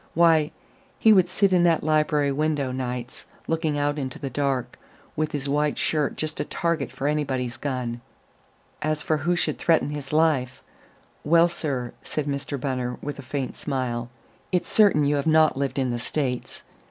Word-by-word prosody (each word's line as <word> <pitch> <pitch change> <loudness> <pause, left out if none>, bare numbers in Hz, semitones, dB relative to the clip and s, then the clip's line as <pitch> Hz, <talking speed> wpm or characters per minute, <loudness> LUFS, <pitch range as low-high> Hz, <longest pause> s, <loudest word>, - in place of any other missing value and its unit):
Why, 165 -2 +5 0.5
he 220 - +6
would 185 -3 +4
sit 190 +1 +2
in 180 - +5
that 165 -2 +3
library 150 -2 +2
window, 145 -2 0
nights, 125 -1 -5 0.2
looking 160 -2 0
out 145 +1 0
into 130 -2 -4
the 135 - -5
dark, 135 -1 -1 0.4
with 155 0 -1
his 140 -1 -3
white 150 +1 +1
shirt 150 -3 0
just 155 0 -3
a - - +1
target 170 -4 -1
for 135 - -5
anybody's 135 -4 -1
gun. 125 -3 -3 0.8
As 155 -1 -1
for 155 - +1
who 170 +5 0
should 175 - -1
threaten 160 -3 +2
his 145 -2 -5
life 150 -5 +1 0.6
well, 165 +2 +5
sir," 135 -8 -3
said 150 - -3
Mr. 140 0 -3
Bunner 125 -2 -2
with 145 0 -5
a - - -5
faint 130 0 -4
smile, 125 -4 -3 0.4
"it's 180 -2 0
certain 200 -9 +5
you 145 +1 +2
have 140 - -1
not 155 0 +5
lived 140 0 -2
in 130 -2 +1
the 120 - -2
States. 125 0 -3
145 Hz, 175 wpm, -25 LUFS, 130-155 Hz, 0.8 s, he